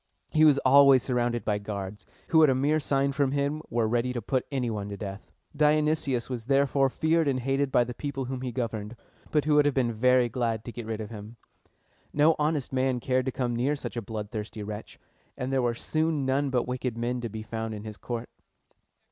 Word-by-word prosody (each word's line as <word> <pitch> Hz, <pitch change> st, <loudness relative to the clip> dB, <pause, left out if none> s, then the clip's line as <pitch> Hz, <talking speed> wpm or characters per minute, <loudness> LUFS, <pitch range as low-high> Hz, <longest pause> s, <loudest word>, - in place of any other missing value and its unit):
He 155 Hz, 0 st, +5 dB
was 145 Hz, -3 st, +6 dB
always 135 Hz, -1 st, +7 dB
surrounded 120 Hz, -2 st, -1 dB
by 105 Hz, -1 st, 0 dB
guards, 100 Hz, -1 st, -6 dB, 0.2 s
who 160 Hz, -, +5 dB
at 155 Hz, -, +6 dB
a 130 Hz, -, +3 dB
mere 145 Hz, +4 st, +2 dB
sign 140 Hz, -1 st, +1 dB
from 140 Hz, -1 st, 0 dB
him 145 Hz, +2 st, -1 dB
were 115 Hz, -1 st, +1 dB
ready 120 Hz, +2 st, 0 dB
to 120 Hz, -, -2 dB
put 130 Hz, +3 st, -1 dB
any 130 Hz, -3 st, -1 dB
one 105 Hz, -2 st, -4 dB
to 100 Hz, -, -6 dB
death. 100 Hz, 0 st, -7 dB, 0.3 s
Dionysius 150 Hz, -4 st, +2 dB
was 120 Hz, -4 st, -5 dB
therefore 135 Hz, 0 st, +3 dB
feared 160 Hz, +3 st, +1 dB
and 130 Hz, -2 st, +1 dB
hated 135 Hz, +2 st, 0 dB
by 120 Hz, -, +4 dB
the 120 Hz, +1 st, -6 dB
people 135 Hz, 0 st, -4 dB
whom 130 Hz, 0 st, -4 dB
he 130 Hz, -1 st, -3 dB
governed, 115 Hz, -2 st, -4 dB, 0.3 s
but 150 Hz, -2 st, +1 dB
who 150 Hz, -, +2 dB
would 150 Hz, 0 st, +5 dB
have 145 Hz, -, +1 dB
been 120 Hz, -3 st, +1 dB
very 125 Hz, +2 st, +4 dB
glad 115 Hz, -3 st, -2 dB
to 120 Hz, -, -5 dB
get 120 Hz, -2 st, -7 dB
rid 110 Hz, -1 st, -3 dB
of 110 Hz, -, -7 dB
him. 110 Hz, +1 st, -9 dB, 0.8 s
No 155 Hz, +2 st, +4 dB
honest 150 Hz, -3 st, 0 dB
man 130 Hz, -1 st, +1 dB
cared 130 Hz, +1 st, 0 dB
to -, -, +1 dB
come 120 Hz, -2 st, -2 dB
near 130 Hz, +5 st, +1 dB
such 145 Hz, -, -6 dB
a 120 Hz, -, -2 dB
bloodthirsty 105 Hz, 0 st, -6 dB
wretch, 105 Hz, +1 st, -7 dB, 0.4 s
and 130 Hz, +1 st, -3 dB
there 135 Hz, -, +2 dB
were 120 Hz, -1 st, 0 dB
soon 155 Hz, +2 st, -1 dB
none 135 Hz, +2 st, +1 dB
but 125 Hz, -2 st, 0 dB
wicked 125 Hz, -2 st, -3 dB
men 120 Hz, +1 st, -2 dB
to 120 Hz, -, -4 dB
be 110 Hz, +1 st, -6 dB
found 110 Hz, 0 st, -4 dB
in 105 Hz, -, -8 dB
his 105 Hz, -1 st, -8 dB
court. 120 Hz, -1 st, -5 dB
125 Hz, 220 wpm, -27 LUFS, 115-140 Hz, 0.8 s, always